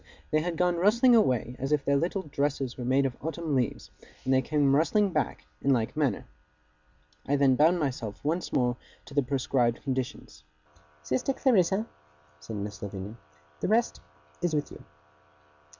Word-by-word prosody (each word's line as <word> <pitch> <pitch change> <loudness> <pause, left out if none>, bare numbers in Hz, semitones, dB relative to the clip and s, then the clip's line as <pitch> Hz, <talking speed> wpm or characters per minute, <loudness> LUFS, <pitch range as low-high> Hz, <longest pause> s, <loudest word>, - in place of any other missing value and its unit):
They 155 - +3
had 170 0 -3
gone 180 0 +2
rustling 235 +7 +4
away 125 - +2
as 135 +2 -3
if 150 -2 +1
their 140 - +3
little 175 +6 0
dresses 140 -3 -2
were 125 - -6
made 130 +3 +2
of 130 -2 -2
autumn 160 0 -3
leaves: 125 -4 -1 0.3
and 130 - +2
they 130 - +4
came 145 -1 +2
rustling 195 +6 +2
back, 145 - -2 0.2
in 140 - +2
like 115 +2 -1
manner. 140 -9 0 1.0
I 145 - +2
then 135 -2 +4
bound 165 +6 +4
myself 125 -8 -3
once 165 +4 -1
more 125 -1 +1 0.3
to 140 - -12
the 145 - +3
prescribed 125 -2 0
conditions. 130 - -4 0.6
'Sister 130 - 0
Clarissa,' 210 -6 +2 0.5
said 75 +9 -8
Miss 105 -1 -5
Lavinia, 100 +1 -6 0.4
'the - - -1
rest 225 +4 +1 0.4
is 175 -3 0
with 150 - -2
you. - - -11
140 Hz, 165 wpm, -28 LUFS, 125-170 Hz, 1.0 s, rustling